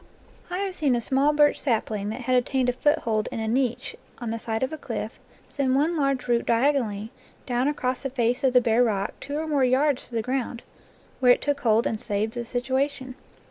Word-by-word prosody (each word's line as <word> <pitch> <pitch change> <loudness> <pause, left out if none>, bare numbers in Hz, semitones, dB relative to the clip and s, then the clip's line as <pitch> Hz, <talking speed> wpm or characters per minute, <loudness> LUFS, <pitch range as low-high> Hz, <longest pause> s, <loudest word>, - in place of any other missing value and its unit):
I 360 - -3
have 390 -1 -2
seen 290 -7 +1
a - - +1
small 270 +5 +2
birch 295 -1 +3
sapling 215 -5 -1
that 220 - -5
had 255 +1 +1
obtained 250 0 +1
a - - +1
foothold 245 -7 +1
in - - -4
a 220 - -2
niche 245 +1 -1 0.2
on 235 -2 -4
the 230 - -3
side 225 +1 -2
of 260 - -2
a - - -4
cliff - - -5 0.3
send 265 -2 0
one 310 +5 +2
large 275 -4 0
root 235 -1 +1
diagonally 230 -4 +1 0.3
down 250 +1 0
across 260 -3 -1
the 270 - -3
face 245 +1 0
of 260 -2 +3
the 250 - +6
bare 235 0 +3
rock 205 -4 -1
two 285 +1 -5
or 315 - -2
more 290 -4 +1
yards 265 +2 +2
to 240 - -8
the 225 - 0
ground, 250 -1 -3 0.6
where 250 -1 +6
it - - -2
took 285 -1 -1
hold 225 -2 +3
and 220 - -2
saved 210 +2 -1
the 240 - -4
situation. 260 +2 -2
250 Hz, 220 wpm, -25 LUFS, 230-280 Hz, 0.6 s, the